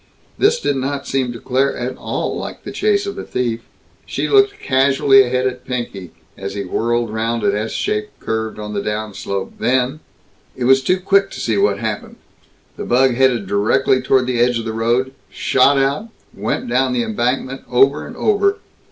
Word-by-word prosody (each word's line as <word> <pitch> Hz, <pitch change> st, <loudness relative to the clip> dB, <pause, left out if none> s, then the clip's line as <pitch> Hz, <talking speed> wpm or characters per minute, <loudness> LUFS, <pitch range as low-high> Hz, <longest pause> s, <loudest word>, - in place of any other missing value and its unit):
This 460 Hz, +4 st, +3 dB
did 140 Hz, -, 0 dB
not 140 Hz, +1 st, -3 dB
seem 130 Hz, -2 st, -1 dB
to 120 Hz, -, -8 dB
Claire 135 Hz, +4 st, 0 dB
at 125 Hz, +1 st, -3 dB
all -, -, -3 dB
like -, -, -6 dB
the -, -, -6 dB
chase 405 Hz, -1 st, +1 dB
of 400 Hz, -, -5 dB
a -, -, -5 dB
thief. 120 Hz, -2 st, -2 dB, 0.5 s
She -, -, -2 dB
looked 410 Hz, 0 st, +3 dB
casually 135 Hz, +1 st, +4 dB
ahead 125 Hz, 0 st, 0 dB
at 125 Hz, -1 st, -2 dB
Pinky, 115 Hz, -8 st, -5 dB, 0.3 s
as 100 Hz, 0 st, -6 dB
he 100 Hz, -, -3 dB
whirled 115 Hz, +4 st, -1 dB
round 115 Hz, +1 st, -1 dB
an -, -, +2 dB
S 110 Hz, +2 st, -2 dB
shaped 105 Hz, 0 st, -3 dB
curve 110 Hz, 0 st, -3 dB
on 105 Hz, 0 st, -6 dB
the 100 Hz, -, -1 dB
downslope, 105 Hz, -2 st, -4 dB
then 130 Hz, +3 st, +1 dB, 0.6 s
It 125 Hz, -, -4 dB
was 135 Hz, +2 st, +5 dB
too 185 Hz, +7 st, +2 dB
quick 195 Hz, +1 st, +3 dB
to -, -, -8 dB
see 110 Hz, -, 0 dB
what 100 Hz, 0 st, +2 dB
happened. 110 Hz, -1 st, -4 dB, 0.6 s
The -, -, -4 dB
bug 130 Hz, +1 st, +3 dB
headed 125 Hz, -4 st, +2 dB
directly 110 Hz, +7 st, +2 dB
toward 130 Hz, 0 st, +2 dB
the 125 Hz, -1 st, -1 dB
edge 120 Hz, 0 st, +3 dB
of 115 Hz, -, -4 dB
the 110 Hz, -, -3 dB
road, 120 Hz, +4 st, 0 dB, 0.2 s
shot 135 Hz, +2 st, +3 dB
out, 140 Hz, +11 st, 0 dB, 0.2 s
went 105 Hz, +3 st, -3 dB
down 125 Hz, +1 st, +1 dB
the 120 Hz, -1 st, +1 dB
embankment, 125 Hz, +4 st, -2 dB
over 135 Hz, +3 st, +3 dB
and -, -, -10 dB
over. 405 Hz, -1 st, +2 dB
125 Hz, 185 wpm, -19 LUFS, 110-135 Hz, 0.6 s, was